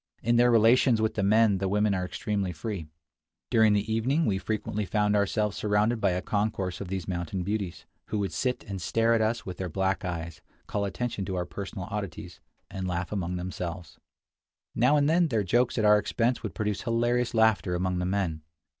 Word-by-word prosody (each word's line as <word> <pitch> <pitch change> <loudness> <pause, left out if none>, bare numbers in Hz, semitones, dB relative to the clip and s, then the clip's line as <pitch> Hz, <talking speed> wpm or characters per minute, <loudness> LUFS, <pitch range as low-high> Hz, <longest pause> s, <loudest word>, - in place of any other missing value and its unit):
In 120 +1 +2
their 120 +1 +5
relations 115 +1 +5
with 110 0 +1
the 105 - -1
men 105 0 +4
the 95 0 -1
women 105 +1 +2
are 95 -1 -1
extremely 100 0 -2
free. 90 0 -5 0.6
During 110 -2 +5
the 105 +2 0
evening 135 +9 +1
we 95 -2 +1
frequently 105 +1 -2
found 105 +1 +1
ourselves 105 0 +1
surrounded 105 +2 +1
by - - +3
a 90 +1 -1
concourse 100 -4 -1
of 100 - -5
these 95 -1 -4
mountain 90 0 -3
beauties, 100 -3 -3 0.2
who 110 - -2
would 100 -2 -2
sit 125 -1 -1
and 95 -2 -6
stare 115 +5 +2
at 115 - +2
us 115 +2 0
with 90 -2 -6
their 95 -1 -4
black 95 +4 -1
eyes, 85 -2 -5 0.2
call 100 -1 -2
attention 110 0 -3
to 95 - -3
our 90 -1 -1
personal 95 +1 -6
oddities, 100 -6 -6 0.3
and 95 -1 -4
laugh 90 0 -3
among 90 -3 -2
themselves. 90 -1 -6 0.7
Now 125 +6 +4
and 145 -1 +3
then 170 +2 +3
their 115 -7 0
jokes 120 +8 +1
at 110 - +2
our 105 0 +6
expense 120 +3 0
would - - -6
produce 105 -2 -2
hilarious 120 0 0
laughter 110 -6 +3
among 90 0 -1
the 90 - -1
men. 90 -5 -1
105 Hz, 200 wpm, -27 LUFS, 95-110 Hz, 0.7 s, our